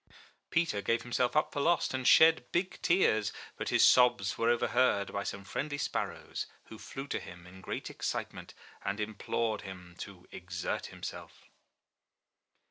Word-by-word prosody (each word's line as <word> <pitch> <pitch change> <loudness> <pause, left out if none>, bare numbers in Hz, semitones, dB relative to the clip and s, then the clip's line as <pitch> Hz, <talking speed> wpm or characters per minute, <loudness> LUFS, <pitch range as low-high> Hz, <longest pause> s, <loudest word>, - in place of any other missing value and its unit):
Peter 165 -12 +1
gave 115 +3 0
himself 125 +2 0
up 155 - +2
for 145 - -2
lost, 170 +1 +2
and 130 -1 -1
shed 160 0 +6
big 180 +2 -1
tears; 110 - +3 0.2
but - - -4
his - - +6
sobs 120 -5 +4
were 115 - +1
overheard 120 -3 +2
by 100 - -1
some 100 0 -5
friendly 145 +9 -3
sparrows, - - -3 0.2
who 110 - -10
flew 135 - -7
to - - -3
him 85 0 -11
in 95 +1 -13
great - - -5
excitement, - - -5 0.3
and 100 +2 -2
implored 110 +1 -2
him 90 -2 -10
to 95 -2 -9
exert 90 -2 -4
himself. - - -9
115 Hz, 150 wpm, -31 LUFS, 100-135 Hz, 0.3 s, shed